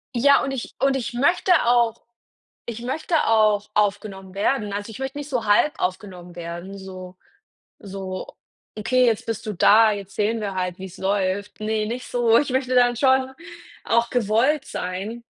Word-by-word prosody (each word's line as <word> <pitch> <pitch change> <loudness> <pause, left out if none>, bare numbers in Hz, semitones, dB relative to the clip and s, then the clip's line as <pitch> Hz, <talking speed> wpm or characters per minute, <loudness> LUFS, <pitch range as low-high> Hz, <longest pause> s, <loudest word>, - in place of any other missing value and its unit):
Ja 280 +4 +5
und 270 - -2
ich 265 -3 -6
und 270 +1 +2
ich 245 -2 -3
möchte 340 +9 +2
auch 235 -1 +2 0.6
ich 235 -1 -6
möchte 305 +7 -2
auch 215 -2 +3
aufgenommen 200 -2 -1
werden. 210 +1 0
Also 205 +2 -4
ich 220 - -10
möchte 265 +1 -4
nicht 290 0 -6
so 245 -5 -2
halb 210 +9 +3
aufgenommen 180 -2 -4
werden, 175 +3 -7
so 185 -1 -10 0.6
so: 190 -2 -6 0.5
„Okay, 250 +4 +2
jetzt 230 -3 +1
bist 225 0 -4
du 215 - -3
da, 215 +4 +5
jetzt 200 -2 -6
sehen 220 +2 0
wir 200 -2 -3
halt, 180 -1 -2
wie's 190 -1 -9
läuft.“ 195 +1 -2
Ne, 215 0 -1
nicht 245 +2 -5
so. 235 -2 +3
Ich 290 - +1
möchte 255 0 0
dann 245 -1 +4
schon 260 +1 +2 0.5
auch 235 +1 +1
gewollt 250 +5 +1
sein. 195 +6 -5
220 Hz, 170 wpm, -23 LUFS, 195-250 Hz, 0.6 s, Ja